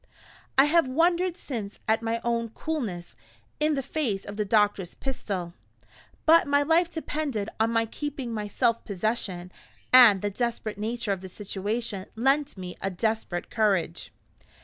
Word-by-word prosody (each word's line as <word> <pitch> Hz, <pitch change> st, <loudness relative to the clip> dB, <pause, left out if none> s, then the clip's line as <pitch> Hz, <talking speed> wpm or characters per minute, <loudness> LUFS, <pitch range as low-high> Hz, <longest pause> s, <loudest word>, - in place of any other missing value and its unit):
I 270 Hz, -, +9 dB
have 325 Hz, -1 st, +3 dB
wondered 345 Hz, +5 st, +2 dB
since 220 Hz, -, -6 dB
at 220 Hz, +1 st, +2 dB
my 230 Hz, 0 st, -2 dB
own 235 Hz, -1 st, 0 dB
coolness 220 Hz, -, -4 dB, 0.4 s
in 305 Hz, 0 st, +2 dB
the 275 Hz, -, -2 dB
face 240 Hz, -10 st, -1 dB
of 205 Hz, -, -7 dB
the 210 Hz, -, 0 dB
doctor's 205 Hz, -3 st, +1 dB
pistol; 195 Hz, -10 st, -4 dB, 0.7 s
but 330 Hz, 0 st, +6 dB
my 285 Hz, 0 st, +3 dB
life 330 Hz, +3 st, +3 dB
depended 295 Hz, -10 st, -3 dB
on 225 Hz, +1 st, +3 dB
my 230 Hz, 0 st, +2 dB
keeping 265 Hz, 0 st, -5 dB
my 210 Hz, -1 st, -3 dB
self 230 Hz, +2 st, +1 dB
possession, 195 Hz, -3 st, -2 dB, 0.4 s
and 230 Hz, -7 st, +8 dB
the 205 Hz, -, 0 dB
desperate 225 Hz, -2 st, -3 dB
nature 225 Hz, 0 st, -2 dB
of 195 Hz, -2 st, -2 dB
the 190 Hz, -, -8 dB
situation 205 Hz, +1 st, -4 dB
lent 270 Hz, +3 st, +1 dB
me 180 Hz, -1 st, -7 dB
a 195 Hz, -, -1 dB
desperate 195 Hz, -2 st, -2 dB
courage. 195 Hz, -6 st, 0 dB
225 Hz, 150 wpm, -27 LUFS, 200-275 Hz, 0.7 s, I